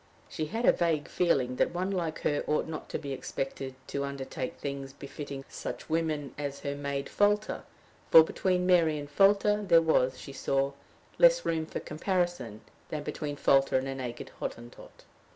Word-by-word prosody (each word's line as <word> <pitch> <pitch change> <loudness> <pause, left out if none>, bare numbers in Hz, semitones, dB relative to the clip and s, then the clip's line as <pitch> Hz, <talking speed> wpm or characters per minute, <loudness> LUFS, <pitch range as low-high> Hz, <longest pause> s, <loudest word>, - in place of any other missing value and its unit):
She 155 - -4
had 225 +7 -2
a - - +8
vague 160 -4 0
feeling 130 -8 +1
that - - +1
one 185 +2 -1
like 170 -5 -2
her 145 - 0
ought 150 - +1
not 160 -1 -7
to - - -2
be 140 -2 -5
expected 135 0 -4
to 140 - -3
undertake 135 -2 -5
things 140 -1 -5
befitting 140 0 -7
such - - -7
women 155 -3 -1
as 140 -1 -4
her 140 - -2
maid 140 -1 -3
Folter; 205 +4 +1 0.5
for 160 - +10
between 180 +2 0
Mary 170 -4 +4
and 145 -1 -6
Folter 205 +1 +4
there 170 -2 +7
was, 130 -6 +2
she 140 - -9
saw, 135 0 0 0.5
less - - +6
room 160 -1 0
for - - -4
comparison 160 - -2 0.3
than 150 -1 -4
between 145 -1 -4
Folter 135 -1 +3
and 130 +1 -2
a 135 - -2
naked 125 -3 -6
Hottentot. 120 0 -8
150 Hz, 170 wpm, -29 LUFS, 135-175 Hz, 0.5 s, for